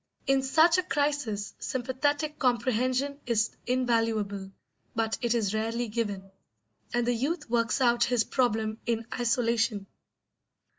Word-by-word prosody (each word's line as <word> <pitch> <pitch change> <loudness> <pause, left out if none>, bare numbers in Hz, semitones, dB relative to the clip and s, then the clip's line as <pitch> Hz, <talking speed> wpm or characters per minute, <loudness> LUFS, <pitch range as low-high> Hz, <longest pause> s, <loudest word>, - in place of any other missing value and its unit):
In 270 0 +3
such 320 +6 +4
a - - +3
crisis 285 - -1
sympathetic 285 +4 -1
comprehension 255 +2 +1
is 225 -2 +2 0.2
invaluable, 225 -6 0 0.4
but 225 0 0
it 240 -1 +1
is 215 -3 0
rarely 225 +2 -1
given, 205 -4 -3 0.6
and 240 0 +1
the 245 - +2
youth 295 +6 -2
works 230 0 +1
out 240 -1 +4
his 245 -2 +2
problem 220 -3 0
in 230 -1 0
isolation. 230 -3 +1
240 Hz, 120 wpm, -28 LUFS, 220-260 Hz, 0.6 s, such